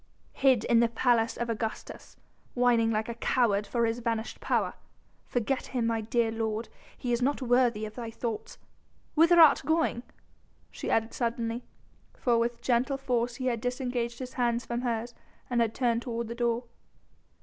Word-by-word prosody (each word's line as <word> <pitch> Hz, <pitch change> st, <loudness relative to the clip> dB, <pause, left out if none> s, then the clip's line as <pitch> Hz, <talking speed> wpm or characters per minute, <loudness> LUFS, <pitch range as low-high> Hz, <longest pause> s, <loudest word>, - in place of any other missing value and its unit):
"Hid 260 Hz, -5 st, +3 dB
in 235 Hz, -1 st, +4 dB
the 235 Hz, -, +4 dB
Palace 235 Hz, 0 st, +1 dB
of 235 Hz, -, -2 dB
Augustus, 225 Hz, -1 st, -5 dB, 0.4 s
whining 240 Hz, -2 st, +3 dB
like 220 Hz, -1 st, 0 dB
a 235 Hz, -, -3 dB
coward 225 Hz, -3 st, +1 dB
for 235 Hz, -1 st, +1 dB
his 225 Hz, +1 st, -1 dB
vanished 230 Hz, -1 st, -3 dB
power.... -, -, 0 dB, 0.5 s
Forget 250 Hz, +2 st, -1 dB
him, 245 Hz, -3 st, -1 dB
my 230 Hz, -1 st, 0 dB
dear 225 Hz, +1 st, +1 dB
lord... 225 Hz, 0 st, -2 dB, 0.3 s
he 245 Hz, -1 st, -2 dB
is 235 Hz, -, 0 dB
not 280 Hz, +3 st, +1 dB
worthy 245 Hz, -4 st, +2 dB
of 215 Hz, -, -8 dB
thy 235 Hz, -1 st, -6 dB
thoughts.... 225 Hz, -1 st, -5 dB, 0.6 s
Whither 335 Hz, +2 st, +5 dB
art 315 Hz, -3 st, +8 dB
going?" 315 Hz, -4 st, +1 dB, 0.7 s
she -, -, -5 dB
added 225 Hz, 0 st, +1 dB
suddenly, 230 Hz, 0 st, -2 dB, 0.5 s
for 235 Hz, -2 st, +2 dB
with 235 Hz, 0 st, -2 dB
gentle 255 Hz, +3 st, +1 dB
force 245 Hz, -3 st, -1 dB
he 255 Hz, -, -5 dB
had 235 Hz, -3 st, 0 dB
disengaged 245 Hz, -1 st, -2 dB
his 255 Hz, 0 st, -7 dB
hands 240 Hz, -1 st, 0 dB
from 235 Hz, 0 st, -3 dB
hers 240 Hz, -1 st, -2 dB, 0.4 s
and 240 Hz, -1 st, +2 dB
had 225 Hz, -1 st, 0 dB
turned 235 Hz, -2 st, +1 dB
toward 235 Hz, -2 st, -4 dB
the -, -, -3 dB
door. 235 Hz, 0 st, 0 dB
235 Hz, 170 wpm, -29 LUFS, 230-245 Hz, 0.7 s, art